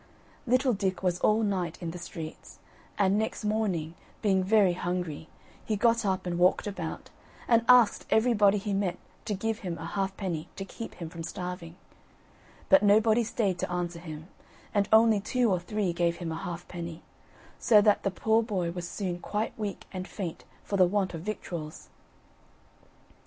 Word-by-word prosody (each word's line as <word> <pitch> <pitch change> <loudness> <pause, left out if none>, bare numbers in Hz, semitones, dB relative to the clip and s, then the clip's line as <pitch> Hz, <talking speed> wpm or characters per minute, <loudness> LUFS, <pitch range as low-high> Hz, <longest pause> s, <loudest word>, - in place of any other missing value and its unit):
Little 255 +1 +3
Dick 190 -2 -2
was 180 -1 +1
all 215 +1 +3
night 185 -5 -1
in 170 -2 -4
the 175 - -8
streets; 165 -2 -8 0.4
and 200 0 +3
next 220 0 -3
morning, 195 -7 -1 0.3
being 190 -3 +3
very 195 -2 +4
hungry, 175 -3 -3 0.3
he 215 - -1
got 230 0 +2
up 190 -1 -1
and 175 -1 -2
walked 180 +1 +3
about, 205 -1 -5 0.4
and 230 -1 +4
asked 245 -4 +6
everybody 215 -3 +4
he 200 0 -3
met 195 -3 0 0.3
to 210 - -1
give 225 +3 -2
him 175 -4 -4
a 165 - -7
halfpenny 190 -4 -3
to 195 - -5
keep 225 +3 -8
him 170 -2 -7
from 165 - -7
starving; 180 0 -6 0.9
but 285 - +6
nobody 220 +3 +4
stayed 205 -5 -1
to - - -2
answer 175 -1 -2
him, 160 -1 -8 0.5
and 200 -1 +1
only 220 -1 +6
two 240 +2 +1
or 185 - +2
three 190 0 -2
gave 170 0 +1
him 170 -2 -4
a - - -3
halfpenny; 170 0 -6 0.6
so 215 -3 +6
that 205 0 +4
the - - 0
poor 220 +4 +2
boy 190 -7 -2
was 175 0 -5
soon 180 -4 -3
quite 210 +4 -2
weak 210 -3 -5
and 185 0 -5
faint 180 -6 -6 0.2
for 200 - -2
the 185 -2 +6
want 195 0 0
of 165 - -5
victuals. 170 -5 -6
190 Hz, 170 wpm, -28 LUFS, 175-215 Hz, 0.9 s, asked